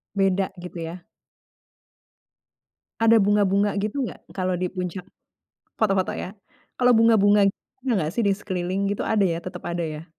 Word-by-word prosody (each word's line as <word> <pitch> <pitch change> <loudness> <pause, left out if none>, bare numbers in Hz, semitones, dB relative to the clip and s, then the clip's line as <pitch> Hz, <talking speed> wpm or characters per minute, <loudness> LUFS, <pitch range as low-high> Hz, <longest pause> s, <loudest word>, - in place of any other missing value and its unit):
Beda 195 -1 +1
gitu, 180 -1 -8
ya. 165 +2 -6 2.0
Ada 225 -1 +6
bunga-bunga 200 0 +3
gitu 210 +7 -2
gak - - -14
kalau 185 -1 -1
di 180 +1 -3
puncak? 180 0 -4 0.7
Foto-foto, 195 -4 +2
ya, 190 +4 -6 0.4
kalau 250 0 +4
bunga-bunga 210 -3 +5 0.3
ada 260 0 -1
nggak, 155 -3 -1
sih, 235 - 0
di 195 - +3
sekeliling 190 0 -2
gitu 205 - -2
ada, 210 -2 +2
ya, 170 -2 0
tetap 180 0 -8
ada, 170 0 -2
ya? 155 -1 -5
195 Hz, 145 wpm, -24 LUFS, 180-205 Hz, 2.0 s, Ada